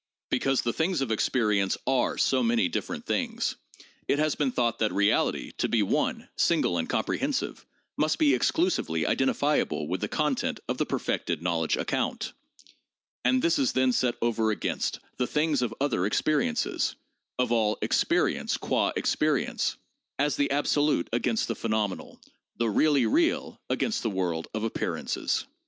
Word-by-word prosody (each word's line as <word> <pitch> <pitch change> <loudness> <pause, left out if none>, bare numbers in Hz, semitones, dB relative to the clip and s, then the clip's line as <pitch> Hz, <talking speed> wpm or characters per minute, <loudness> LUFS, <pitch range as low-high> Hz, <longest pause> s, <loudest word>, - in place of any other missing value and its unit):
Because 135 -1 +1
the 120 - 0
things 165 -2 0
of 130 -4 -1
experience 105 -3 +1
are 130 -1 +1
so 130 -1 +2
many 115 -5 +2
different - - -4
things, - - -1 0.5
it - - +2
has 155 0 +2
been 140 -3 0
thought 120 -2 0
that 110 - +1
reality 100 +1 +1
to - - +1
be 115 -3 +2
one, 95 - -1
single 85 - +2
and 80 - -3
comprehensive, - - -2 0.3
must 155 +1 +1
be 145 -3 +4
exclusively 125 - +1
identifiable 135 - +1
with - - -2
the - - -1
content - - -1
of - - -2
the - - 0
perfected 85 -1 -2
knowledge 85 -2 0
account; - - -2 0.9
and 125 +1 +3
this 170 0 +3
is 135 - +2
then 130 0 +3
set 125 -1 +1
over 115 -2 +1
against 105 - -2 0.2
the 125 - 0
things 150 -2 +1
of 120 -3 0
other 120 -10 +1
experiences 140 - 0 0.4
(of 125 -2 0
all 110 -2 +2
experience - - +1
qua - - 0
experience), - - 0 0.4
as 145 +1 +1
the 145 - +1
absolute 145 - +1
against 120 -1 +1
the - - -1
phenomenal, 110 -4 -2 0.4
the 115 -2 +1
really 145 +5 +3
real 335 +4 +1
against 220 - 0
the 115 - -1
world 90 -4 -2
of 110 0 -1
ap 115 - -3
pearances. - - -2
120 Hz, 155 wpm, -27 LUFS, 105-145 Hz, 0.9 s, be